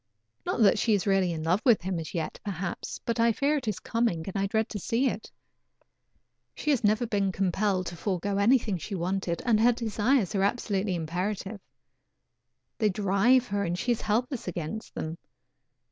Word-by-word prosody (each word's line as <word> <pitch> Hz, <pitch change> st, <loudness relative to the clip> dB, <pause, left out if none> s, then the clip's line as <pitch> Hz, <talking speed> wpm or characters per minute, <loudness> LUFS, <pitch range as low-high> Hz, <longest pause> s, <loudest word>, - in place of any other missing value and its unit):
Not -, -, 0 dB
that 205 Hz, -, +5 dB
she 220 Hz, -3 st, +3 dB
is 195 Hz, -, -1 dB
really 195 Hz, -3 st, +2 dB
in 160 Hz, -2 st, -4 dB
love 180 Hz, +6 st, +2 dB
with 235 Hz, -8 st, +4 dB
him 185 Hz, -2 st, -2 dB
as 160 Hz, +3 st, -7 dB
yet 160 Hz, -2 st, -3 dB
perhaps, 185 Hz, -3 st, -4 dB
but 230 Hz, 0 st, -1 dB
I 230 Hz, 0 st, +5 dB
fear 280 Hz, +7 st, +1 dB
it 260 Hz, -5 st, -5 dB
is 210 Hz, -3 st, -1 dB
coming 230 Hz, -9 st, 0 dB
and 195 Hz, -, -6 dB
I 195 Hz, 0 st, +1 dB
dread 220 Hz, +2 st, 0 dB
to 210 Hz, -, -4 dB
see 235 Hz, +8 st, +1 dB
it. 220 Hz, -3 st, -4 dB, 1.3 s
She 300 Hz, -, 0 dB
has 265 Hz, -6 st, +1 dB
never 215 Hz, +3 st, +3 dB
been 200 Hz, -4 st, 0 dB
compelled 190 Hz, 0 st, 0 dB
to 175 Hz, +1 st, -5 dB
forego 195 Hz, +2 st, -2 dB
anything 220 Hz, -3 st, +3 dB
she 200 Hz, -, -5 dB
wanted, 180 Hz, -1 st, -2 dB
and 230 Hz, -3 st, +3 dB
her 240 Hz, +2 st, +5 dB
desires 230 Hz, -1 st, +1 dB
are 195 Hz, -, +1 dB
absolutely 200 Hz, -2 st, 0 dB
imperative. 190 Hz, +5 st, -3 dB, 1.2 s
They 215 Hz, -3 st, +3 dB
drive 205 Hz, +6 st, +3 dB
her, 200 Hz, 0 st, 0 dB
and 175 Hz, -1 st, -1 dB
she 245 Hz, -, 0 dB
is 235 Hz, -, 0 dB
helpless 235 Hz, +3 st, -1 dB
against 180 Hz, +5 st, -5 dB
them. 160 Hz, +1 st, -4 dB
200 Hz, 185 wpm, -28 LUFS, 185-230 Hz, 1.3 s, that